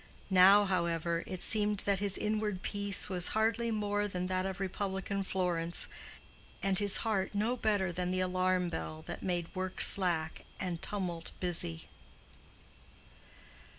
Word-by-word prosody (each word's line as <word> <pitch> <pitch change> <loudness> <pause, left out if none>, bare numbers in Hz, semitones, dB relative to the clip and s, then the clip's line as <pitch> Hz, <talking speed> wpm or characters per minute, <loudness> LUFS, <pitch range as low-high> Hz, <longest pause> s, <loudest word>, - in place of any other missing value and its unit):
Now, 195 +2 +7
however, 170 -2 -1
it 185 -2 -3
seemed 210 -2 +4
that 200 -2 0
his 200 -1 0
inward 210 -3 -2
peace 200 -1 -2
was 180 -2 +1
hardly 225 +2 +1
more 205 -1 -1
than 180 -2 -4
that 185 +1 -1
of 190 0 -5
republican 195 0 -3
Florence, 175 -3 0 0.8
and 195 -1 +2
his 205 -1 +5
heart 205 -3 -1
no 220 +5 0
better 205 -6 0
than 180 +1 -3
the 185 0 -1
alarm 185 -1 0
bell 155 -1 -6
that - - -7
made 175 -2 -3
work 185 -1 -4
slack 170 -5 +3 0.2
and 175 -3 -4
tumult 180 -5 -4
busy. 160 - -1
190 Hz, 140 wpm, -32 LUFS, 180-205 Hz, 0.8 s, Now